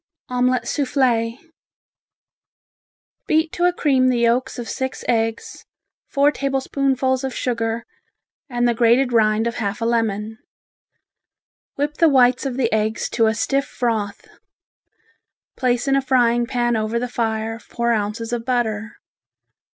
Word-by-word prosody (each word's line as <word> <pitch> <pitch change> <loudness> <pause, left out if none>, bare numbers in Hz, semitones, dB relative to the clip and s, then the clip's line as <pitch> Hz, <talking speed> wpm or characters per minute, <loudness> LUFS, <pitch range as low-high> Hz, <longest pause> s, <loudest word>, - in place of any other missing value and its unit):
Omelette 250 -1 +1
Souffle 250 -5 +1 1.9
Beat 315 +1 +2
to 350 - 0
a 355 - +4
cream 270 -7 +2
the 245 -2 +2
yolks 240 +2 +1
of 240 -2 -5
six 260 0 -4
eggs, 225 -1 -1 0.4
four 285 +1 +3
tablespoonfuls 270 -1 0
of 265 -1 -3
sugar 230 -1 -2 0.6
and 240 -1 +1
the 240 - +2
grated 240 +2 +3
rind 215 -1 +3
of 235 0 -2
half 205 -3 -2
a 230 - -2
lemon. 220 -1 -1 1.4
Whip 295 +1 -2
the 330 - +5
whites 255 -1 +4
of 255 -2 -4
the 240 -4 0
eggs 220 +1 0
to 225 -2 +2
a 220 - +1
stiff 275 +5 0
froth. 220 -5 -3 1.3
Place 245 +1 0
in 275 - +3
a 275 - +3
frying 240 -2 +2
pan 240 -2 0
over 220 +1 -1
the 250 +1 -1
fire 225 -1 -2
four 235 0 -2
ounces 225 +2 -2
of 235 -1 -2
butter. 225 -4 -1
240 Hz, 135 wpm, -21 LUFS, 225-260 Hz, 1.9 s, the